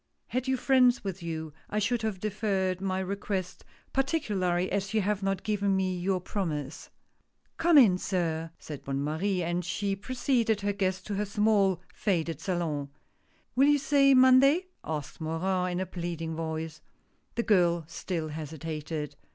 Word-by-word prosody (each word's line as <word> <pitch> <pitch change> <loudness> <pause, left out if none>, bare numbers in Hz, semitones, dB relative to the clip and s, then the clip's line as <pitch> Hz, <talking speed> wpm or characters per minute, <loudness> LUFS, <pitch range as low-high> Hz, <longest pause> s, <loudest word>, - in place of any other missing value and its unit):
Had 255 +1 -2
you 260 0 +2
friends 255 -1 +4
with 195 -2 -4
you, 160 -2 -5 0.2
I 210 - -2
should 225 +3 +1
have 215 -4 -2
deferred 195 -3 -1
my 190 -1 -1
request, 190 -1 -3 0.3
partic 270 -4 0
ularly 180 -1 +1
as 200 +2 -1
you 215 - +4
have 205 0 0
not 195 -1 -1
given 200 -2 +1
me 185 -1 0
your 185 +1 0
promise." 160 -7 -4 0.3
" - - -45
Come 335 -2 +5
in 200 -9 +7
sir," 165 -4 -1
said 150 -3 -8
Bonne 135 0 -2
Marie, 180 +5 0
and 175 +1 -1
she 195 +3 -1
preceded 235 0 0
her 205 0 0
guest 190 -1 -1
to 210 - -4
her 210 - 0
small, 200 -3 +2
faded 165 -6 -1
salon. 160 -6 -2 0.3
" - - -39
Will 270 +3 +5
you 290 0 +5
say 275 -1 +4
Monday? 260 +7 +6
" - - -48
asked 150 0 -5
Morin, 180 +3 -1
in 175 - -1
a 185 - -1
pleading 170 -2 -4
voice. 160 0 -4 0.5
The 235 - 0
girl 175 -6 +3
still 165 0 -4
hesitated. 155 0 -5
190 Hz, 170 wpm, -29 LUFS, 165-210 Hz, 0.5 s, in